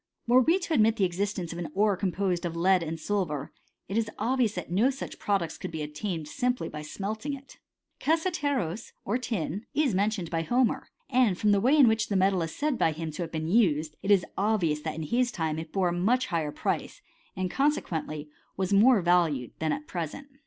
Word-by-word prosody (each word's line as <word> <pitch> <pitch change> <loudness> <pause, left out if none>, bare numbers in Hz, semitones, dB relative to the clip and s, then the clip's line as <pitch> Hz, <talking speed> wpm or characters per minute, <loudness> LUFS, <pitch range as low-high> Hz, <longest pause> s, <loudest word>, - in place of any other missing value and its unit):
:i 240 - +2
Were 255 - +8
we 330 +8 +4
to 350 -3 -3
admit 220 -5 +4
the 205 - 0
existence 185 -1 -2
of 170 - -6
an 165 -4 -5
ore 205 0 +3
composed 185 -1 -1
of 170 -1 -3
lead 185 +2 +3
and 165 0 -4
silver, 155 -7 -2 0.3
it 205 +4 0
is 220 -1 -1
obvious 245 -3 +1
that 180 -2 -5
no 215 +9 +3
such 270 0 -6
product! 190 -6 -1
could - - -5
be 160 -2 -4
obtained 160 +3 -4
by 150 - -11
simply 245 - -2
smelting 215 - -4
it. 275 0 -15
i - - -26
Cassiteros, 285 - 0
or 225 +6 0
tin, 205 -5 -3
is 290 -6 +2
mentioned 195 -3 0
by 165 -1 0
Homer; 245 +8 +1 0.3
and^" 240 -8 +4
from 210 +2 +2
the 200 -1 +3
way 265 +7 +4
in 275 -4 +7
which 220 0 +2
the 200 - 0
metal 190 -1 +3
is 165 -1 -4
said 295 -4 -1
by 160 - +3
him 160 0 -5
t»' 155 - -6
have 165 -1 -4
been 160 -1 -3
used, 160 -7 +2
it 195 - -4
is 200 -3 +5
obvious 195 -8 +1
that 155 +1 -4
in 160 - -4
his 240 +8 +1
time 160 -6 -2
it 160 0 -7
bom 195 - 0
ft 175 - -2
much 250 +6 +2
higher 155 -3 0
price, - - -3 0.3
and, 185 -1 -2
consequently, 160 - -1 0.3
was 190 +1 0
more 215 0 +6
valued 165 -8 +2
than 160 -1 0
at 290 +1 -3
present. 175 - -5
195 Hz, 215 wpm, -28 LUFS, 165-235 Hz, 0.3 s, Were